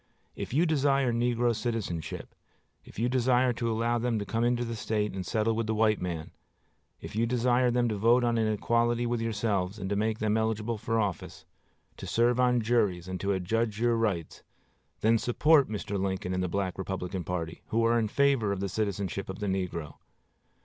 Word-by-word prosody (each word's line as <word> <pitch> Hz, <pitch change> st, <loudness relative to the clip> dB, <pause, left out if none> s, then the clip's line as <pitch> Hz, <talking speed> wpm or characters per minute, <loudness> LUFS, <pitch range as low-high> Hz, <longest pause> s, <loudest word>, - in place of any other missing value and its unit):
If -, -, -5 dB
you 155 Hz, +7 st, +3 dB
desire 140 Hz, -5 st, +2 dB
negro 120 Hz, 0 st, +1 dB
citizenship, 105 Hz, -8 st, -4 dB, 0.5 s
if -, -, -15 dB
you 115 Hz, +3 st, +1 dB
desire 125 Hz, 0 st, +2 dB
to 115 Hz, 0 st, -2 dB
allow 115 Hz, +2 st, 0 dB
them 120 Hz, -1 st, 0 dB
to 100 Hz, -, -3 dB
come 115 Hz, +3 st, -1 dB
into 120 Hz, 0 st, +1 dB
the 115 Hz, 0 st, -4 dB
State 105 Hz, -1 st, -1 dB
and 95 Hz, -1 st, -4 dB
settle 110 Hz, +4 st, 0 dB
with 115 Hz, -1 st, -1 dB
the 110 Hz, -, 0 dB
white 110 Hz, -1 st, +2 dB
man, 85 Hz, -3 st, -4 dB, 0.7 s
if -, -, -8 dB
you 115 Hz, +2 st, +1 dB
desire 125 Hz, +1 st, +2 dB
them 120 Hz, 0 st, +2 dB
to 110 Hz, -2 st, -2 dB
vote 120 Hz, +4 st, +4 dB
on 120 Hz, -1 st, +1 dB
an 110 Hz, -1 st, +2 dB
equality 120 Hz, +2 st, +1 dB
with 120 Hz, -1 st, -1 dB
yourselves, 105 Hz, -4 st, -1 dB
and 95 Hz, -1 st, -5 dB
to -, -, +1 dB
make 110 Hz, +2 st, 0 dB
them 110 Hz, 0 st, +1 dB
eligible 110 Hz, 0 st, -1 dB
to 115 Hz, +1 st, -4 dB
office, 105 Hz, -5 st, -2 dB, 0.5 s
to -, -, -7 dB
serve 120 Hz, +1 st, +2 dB
on 125 Hz, -1 st, +3 dB
juries, 105 Hz, -6 st, +1 dB
and 95 Hz, -1 st, -4 dB
to 100 Hz, -, -1 dB
adjudge 105 Hz, +3 st, -1 dB
your 120 Hz, 0 st, +2 dB
rights, 105 Hz, -8 st, -2 dB, 0.6 s
then 115 Hz, +1 st, +4 dB
support 140 Hz, +3 st, +3 dB
Mr. 105 Hz, -2 st, -3 dB
Lincoln 95 Hz, -1 st, -2 dB
and 90 Hz, -, -1 dB
the 90 Hz, -, 0 dB
Black 95 Hz, +1 st, -2 dB
Republican 95 Hz, -1 st, -4 dB
party, 85 Hz, -1 st, -4 dB
who 115 Hz, +1 st, +1 dB
are 115 Hz, +1 st, +3 dB
in 110 Hz, -, 0 dB
favor 135 Hz, -3 st, +2 dB
of 100 Hz, -, -2 dB
the 100 Hz, 0 st, -2 dB
citizenship 100 Hz, -2 st, -2 dB
of 95 Hz, -, -5 dB
the 105 Hz, -, -4 dB
negro. 90 Hz, -5 st, -3 dB
110 Hz, 200 wpm, -29 LUFS, 100-120 Hz, 0.7 s, vote